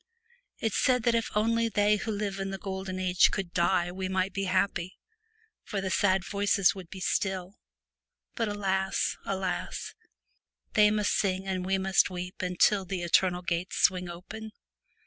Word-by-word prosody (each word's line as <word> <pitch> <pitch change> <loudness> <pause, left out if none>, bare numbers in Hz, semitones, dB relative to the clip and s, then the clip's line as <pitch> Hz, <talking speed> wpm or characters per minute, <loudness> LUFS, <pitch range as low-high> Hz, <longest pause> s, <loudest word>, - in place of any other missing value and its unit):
It 225 - -1
said 250 -3 +2
that 235 - +3
if 230 -1 +1
J - - -12
74 210 - +2
only 230 0 +1
they 210 -1 +3
who 220 - -5
live 200 -2 -2
in 195 0 -2
the 195 - -4
Golden 190 -1 -5
Age 180 -1 +4
The - - +6
could 190 -4 -4
die 175 0 +2
we 185 +1 -4
might 190 0 0
be 195 +1 -2
happy, 185 -1 0 0.6
for 205 - -4
the 190 -1 -2
sad 190 +1 +2
voices 200 -2 +2
would 185 -4 -10
be 190 - -8
still; 190 +1 -2 0.7
but 230 - -1
alas! 190 -2 0
alas! 190 -1 -3 0.8
they 210 0 +6
must 210 -1 +1
sing 190 -1 0
and 185 -1 -2
we 195 0 +2
must 190 +1 +3
weep 180 0 -6
until 185 +2 +2
the 185 -1 -4
Eternal 180 +1 +2
gates 175 +1 -2
swing 180 -1 +2
open. 215 +5 -8
190 Hz, 175 wpm, -28 LUFS, 185-205 Hz, 0.8 s, The